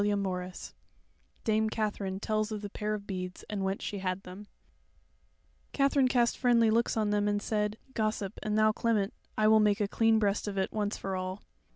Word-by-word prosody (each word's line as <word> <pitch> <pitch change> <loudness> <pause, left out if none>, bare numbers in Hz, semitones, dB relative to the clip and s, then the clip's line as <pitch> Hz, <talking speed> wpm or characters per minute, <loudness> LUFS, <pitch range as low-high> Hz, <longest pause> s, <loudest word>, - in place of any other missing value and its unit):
CHAPTER 205 0 +2
28 185 -2 -4 0.7
Dame 220 0 +2
Katherine 205 -3 -2
Tells 215 +1 -1
of 210 -1 -4
the 205 - -5
Pair 210 0 -2
of 200 -1 -7
Beads, 185 -2 -5
and 200 -2 -2
Whence 190 +1 -2
She 205 - -3
Had 185 0 -2
Them 190 +3 -10 1.3
Katherine 275 -1 +3
cast 240 -2 +2
friendly 235 -3 +4
looks 230 +1 +2
on 215 -2 +1
them 205 0 +2
and 205 0 +1
said: 210 0 -1 0.2
"Gossip, 215 -3 -2
and 215 0 -1
thou, 215 0 +5
Clement, 215 -2 0 0.2
I 215 - +4
will 220 0 +6
make 210 -1 +3
a 205 - +1
clean 225 +2 +3
breast 205 -1 +1
of 200 -1 -4
it 190 - -1
once 210 -1 -1
for 195 -1 -3
all. 185 +2 -4
210 Hz, 195 wpm, -30 LUFS, 195-220 Hz, 1.3 s, will